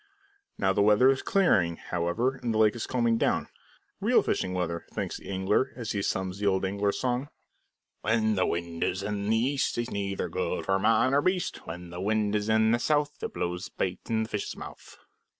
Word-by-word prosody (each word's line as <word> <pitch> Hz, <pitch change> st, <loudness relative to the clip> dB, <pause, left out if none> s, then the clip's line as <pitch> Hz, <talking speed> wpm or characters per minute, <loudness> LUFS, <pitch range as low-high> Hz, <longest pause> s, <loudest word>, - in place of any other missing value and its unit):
Now 95 Hz, -1 st, +2 dB
the 100 Hz, -, +2 dB
weather 105 Hz, +6 st, +6 dB
is 135 Hz, -, -1 dB
clearing, 95 Hz, -, +3 dB
however, 90 Hz, +12 st, -1 dB
and 120 Hz, -2 st, -2 dB
the 110 Hz, -, 0 dB
lake 110 Hz, 0 st, +4 dB
is 120 Hz, -, -4 dB
calming 115 Hz, -2 st, +1 dB
down -, -, +1 dB, 0.5 s
real -, -, +3 dB
fishing 95 Hz, -, -1 dB
weather, 85 Hz, -2 st, -2 dB
thinks -, -, -3 dB
the -, -, -11 dB
angler, 100 Hz, +7 st, +1 dB
and 120 Hz, -, -6 dB
he 100 Hz, -1 st, -1 dB
hums 95 Hz, 0 st, -2 dB
the 105 Hz, -, 0 dB
old 95 Hz, -1 st, +2 dB
angler's 100 Hz, +1 st, 0 dB
song: 125 Hz, +2 st, -1 dB, 0.7 s
"When 110 Hz, 0 st, +2 dB
the 95 Hz, -, +1 dB
wind 85 Hz, -1 st, -2 dB
is 95 Hz, +2 st, -1 dB
in 100 Hz, 0 st, -2 dB
the 110 Hz, -, +3 dB
east, 135 Hz, +4 st, 0 dB
'Tis 120 Hz, +1 st, -3 dB
neither 100 Hz, -1 st, -2 dB
good 90 Hz, 0 st, -2 dB
for 95 Hz, 0 st, +2 dB
man 115 Hz, +5 st, +3 dB
nor 140 Hz, +1 st, +4 dB
beast; 185 Hz, +2 st, -1 dB
When 85 Hz, +1 st, -7 dB
the 90 Hz, +1 st, -6 dB
wind 105 Hz, +1 st, +1 dB
is 105 Hz, 0 st, 0 dB
in 110 Hz, 0 st, +4 dB
the 120 Hz, -, +2 dB
south, 150 Hz, +2 st, 0 dB
It -, -, -3 dB
blows 90 Hz, +1 st, -2 dB
the -, -, -12 dB
bait 90 Hz, -1 st, -1 dB
in 110 Hz, -1 st, +1 dB
the 110 Hz, -, -6 dB
fishes' 105 Hz, -, -4 dB
mouth." -, -, -10 dB
105 Hz, 210 wpm, -28 LUFS, 95-120 Hz, 0.7 s, weather